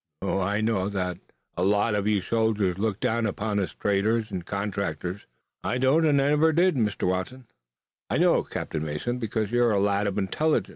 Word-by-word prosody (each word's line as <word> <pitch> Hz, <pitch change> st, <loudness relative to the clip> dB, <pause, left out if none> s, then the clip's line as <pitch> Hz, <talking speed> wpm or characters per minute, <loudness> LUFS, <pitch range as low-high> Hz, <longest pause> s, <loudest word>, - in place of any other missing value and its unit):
Oh, -, -, 0 dB
I 100 Hz, +3 st, 0 dB
know 105 Hz, -3 st, 0 dB
that 90 Hz, -3 st, -3 dB, 0.4 s
a 90 Hz, -, -3 dB
lot 105 Hz, +3 st, +2 dB
of 105 Hz, 0 st, 0 dB
you 105 Hz, -2 st, +2 dB
soldiers 105 Hz, -3 st, 0 dB
look 105 Hz, -1 st, -1 dB
down 115 Hz, 0 st, 0 dB
upon 105 Hz, 0 st, -2 dB
us 95 Hz, -, -3 dB
traders 105 Hz, +2 st, 0 dB
and 90 Hz, -3 st, -4 dB
contractors." 100 Hz, -1 st, -4 dB, 0.4 s
"I 125 Hz, -, -1 dB
don't 135 Hz, +6 st, +3 dB
and 145 Hz, -2 st, +4 dB
I 140 Hz, +1 st, +2 dB
never 150 Hz, +2 st, +4 dB
did, 175 Hz, +3 st, +3 dB
Mr. 105 Hz, -6 st, 0 dB
Watson." 95 Hz, +8 st, -3 dB, 0.6 s
"I -, -, +1 dB
know -, -, +4 dB
it, -, -, -7 dB
Captain 80 Hz, -1 st, -4 dB
Mason, 80 Hz, +12 st, -3 dB
because 110 Hz, -2 st, -2 dB
you're 120 Hz, 0 st, +3 dB
a 100 Hz, -, +2 dB
lad 100 Hz, +1 st, +1 dB
of 100 Hz, 0 st, -2 dB
intelligence. 150 Hz, +11 st, 0 dB
105 Hz, 195 wpm, -26 LUFS, 95-115 Hz, 0.6 s, and